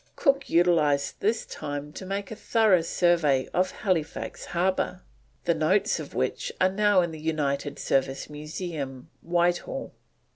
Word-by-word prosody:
Cook 275 -2 +2
utilised 160 -5 +3
this 220 +3 0
time 145 0 -6
to 190 - -8
make 195 +1 -3
a - - -4
thorough 215 -5 +3
survey 165 -6 +2
of 185 +1 +2
Halifax 165 -6 -2
Harbour, 180 +1 -1 0.4
the 170 - +3
notes 185 +7 +2
of - - -8
which - - -1
are 185 - +4
now 205 -1 +4
in 170 -1 -1
the 160 - -8
United 150 -2 -1
Service 135 0 0
Museum, 150 -2 -6
Whitehall. 175 +9 0
170 Hz, 140 wpm, -27 LUFS, 150-190 Hz, 0.4 s, are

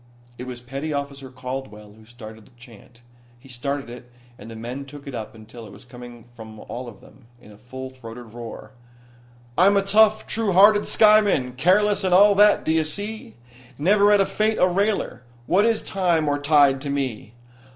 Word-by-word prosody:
It 125 - -7
was 125 -1 -8
petty 135 +5 -6
officer 140 -2 -5
Caldwell 125 -5 -8
who 110 0 -19
started 110 -2 -13
the - - -24
chant. 120 0 -17 0.4
He 135 - -18
started 135 +2 -5
it, 120 +1 -12 0.2
and 115 - -13
the 115 - -10
men 120 +5 -7
took 140 +1 -13
it 140 - -8
up 110 -1 -7
until 110 +1 -13
it - - -14
was 100 +4 -15
coming 120 -1 -13
from 110 -2 -12
all 125 +1 -8
of 105 - -16
them 125 - -20
in 105 - -17
a 105 - -16
full 130 +2 -9
throated 120 -2 -12
roar. 120 -1 -10 0.9
I'm 200 +3 +5
a 195 - +2
tough, 215 +2 +3
true 220 -4 -2
hearted 205 +3 +5
skyman, 210 - +3
Careless 200 +9 +2
and 185 -1 +2
all 205 +2 +6
that, 205 +1 +4
d'ye 160 0 +1
see? 200 - -6 0.4
Never 205 +6 +3
at 200 -1 +3
fate 215 +1 -1
a 180 - +3
railer, 200 - -1 0.2
What 200 - +2
is 225 -2 0
time 175 -5 0
or 145 0 0
tide 145 -2 +3
to 145 - -5
me? 130 -5 -4
135 Hz, 185 wpm, -22 LUFS, 120-195 Hz, 0.9 s, all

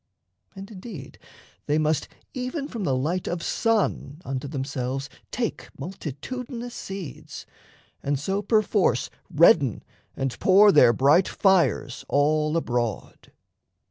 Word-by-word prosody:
And, 195 +2 -9
indeed, 185 - -10 0.5
they 150 - +2
must 155 -1 +1 0.3
Even 255 +3 -4
from 230 -8 -5
the 135 - +1
light 165 +8 -1
of 170 -1 -3
sun 215 -9 0
unto 135 +1 -4
themselves 135 -1 -4 0.2
Take 235 -3 -3
multitudinous 235 - -6
seeds, 190 - -8 0.6
and 140 0 -1
so 195 +7 -1
perforce 205 - +1 0.2
Redden 145 - +4 0.3
and 135 -2 -3
pour 200 +2 +6
their 125 -10 +7
bright 140 - +4
fires 170 -9 +1
all 150 +2 +2
abroad. 120 - -3
160 Hz, 110 wpm, -25 LUFS, 135-205 Hz, 0.6 s, their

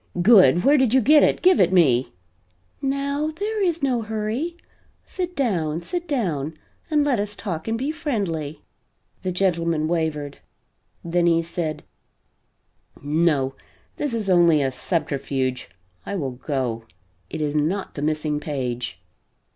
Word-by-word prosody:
"Good! 180 - +6
Where 290 +1 +5
did 260 -2 +3
you - - +7
get 295 +5 +6
it? - - +2
Give 370 0 +5
it 180 - +4
me!" 135 -9 +3 0.7
"Now 280 +2 -1
there 415 +7 -3
is 340 -5 0
no 250 -4 +1
hurry. 220 +10 -3 0.5
Sit 360 -1 -4
down; 170 - -1
sit 350 -1 -4
down 160 - -1 0.3
and 300 -2 +3
let 275 -6 +1
us 205 0 -2
talk 170 -7 -5
and 225 0 0
be 270 +5 -1
friendly." 195 - -3 0.6
The 185 - -2
gentleman 170 -4 0
wavered. 155 -4 -2 0.6
Then 170 0 +1
he 165 0 +3
said: 160 -3 -4 1.2
"No, 145 -3 +1 0.4
this 285 -5 -2
is 215 -3 -3
only 170 -5 +5
a 135 - 0
subterfuge. 135 - -2 0.3
I 200 - -4
will 140 -8 -2
go. 125 -3 -3 0.4
It - - -5
is 150 -1 -1
not 165 +7 -1
the 145 - -6
missing 150 0 -1
page." 125 - -4
175 Hz, 140 wpm, -23 LUFS, -, 1.2 s, you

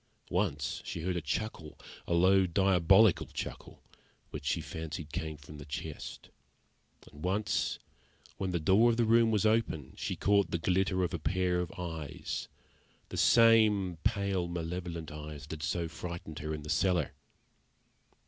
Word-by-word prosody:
Once 75 +6 -1
she 85 - -5
heard 90 +2 -1
a 85 - -1
chuckle, 80 0 -4 0.3
a - - 0
low, 95 +2 +5
diabolical 95 +2 +4
chuckle, - - -7 0.5
which - - -7
she 75 - +1
fancied 80 0 -6
came 80 -2 -3
from 75 +1 -12
the 70 - -9
chest; 70 - -7 0.8
and 75 +1 -12
once, 95 +3 0 0.6
when 95 - -2
the 90 -1 0
door 95 +9 +5
of 115 - +1
the 120 - +3
room 115 +1 +5
was 105 -1 +1
open, 110 - +1
she - - -3
caught 100 -1 +2
the 85 - 0
glitter 95 +2 +1
of 90 - -1
a 85 - -2
pair 90 +2 0
of 90 -1 -3
eyes 80 -5 -5 0.6
the - - -6
same 110 -6 +5
pale, 100 -4 0
malevolent 85 -1 -4
eyes 75 -1 -8
that 75 +1 -7
had - - -6
so 85 -1 -1
frightened 85 -2 -7
her 75 +1 -4
in 75 -1 -4
the 75 - -8
cellar. 90 -6 +2
90 Hz, 160 wpm, -31 LUFS, 80-95 Hz, 0.8 s, low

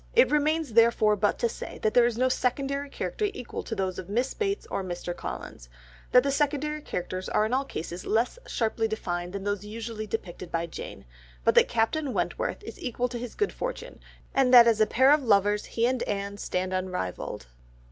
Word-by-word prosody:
It 485 - +6
remains 300 -2 +1
therefore 225 -2 +5
but 205 +1 +1
to 235 - +1
say - - -7
that 215 - +2
there 240 -1 +6
is 235 -2 -2
no 255 +1 +3
secondary 275 +2 -1
character 420 - -2
to 400 - -7
equal 245 - -5
those 190 -5 -3
of 185 - -8
Miss 245 +6 0
Bates 400 -2 -2
or 195 - -1
Mr. 175 -1 -4
Collins, - - -7 0.4
that 250 - +7
the 280 - +1
secondary 295 +1 0
characters 185 -6 -4
are 210 - +2
in 220 - -2
all 270 +2 +1
cases 175 -5 -6
less 230 - 0
sharply 225 -1 0
defined 175 -5 -3
than 200 -1 -4
those 205 0 -2
usually 215 0 -6
depicted 180 -4 -5
by 165 0 0
Jane, 160 - -8 0.4
but - - +5
that - - +6
Captain 255 +5 0
Wentworth - - -2
is - - -9
equal 250 0 -1
to 240 -1 -5
his 245 -1 -7
good 415 - 0
fortune, - - -5 0.3
and 265 -2 +3
that 240 -2 +10
as 225 -2 +3
a 215 - +5
pair 260 +3 +5
of 300 0 +5
lovers 205 -3 +3
he 230 - 0
and 255 0 +1
Anne 200 0 -3
stand 185 -1 -2
unrivalled. 185 - -3
230 Hz, 200 wpm, -27 LUFS, 200-270 Hz, 0.4 s, that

